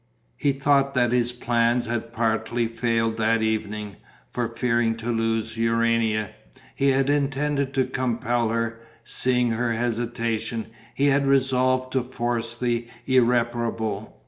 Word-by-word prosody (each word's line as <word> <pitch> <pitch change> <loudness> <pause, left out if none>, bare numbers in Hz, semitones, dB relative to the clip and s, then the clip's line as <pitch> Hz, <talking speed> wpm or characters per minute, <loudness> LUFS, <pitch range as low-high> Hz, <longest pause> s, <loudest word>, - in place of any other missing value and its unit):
He 145 - +1
thought 140 0 +2
that 120 -2 +3
his 120 -1 +2
plans 120 0 +1
had 115 0 -3
partly 115 +1 0
failed 115 -1 0
that 115 0 +2
evening, 105 -2 -2 0.3
for, 120 -2 -1
fearing 115 -1 +1
to 115 +1 -3
lose 115 -1 -1
Urania, 115 -2 +1 0.4
he 140 - +2
had 135 0 +2
intended 140 -1 0
to 130 -1 +3
compel 120 -2 -1
her; 115 0 -2 0.2
seeing 125 0 +1
her 115 +1 0
hesitation, 115 -1 -2 0.3
he 140 - +1
had 140 0 +3
resolved 130 -1 +2
to 130 - +2
force 120 -2 -3
the 120 -1 -1 0.2
irreparable. 120 - 0
120 Hz, 130 wpm, -24 LUFS, 115-130 Hz, 0.4 s, that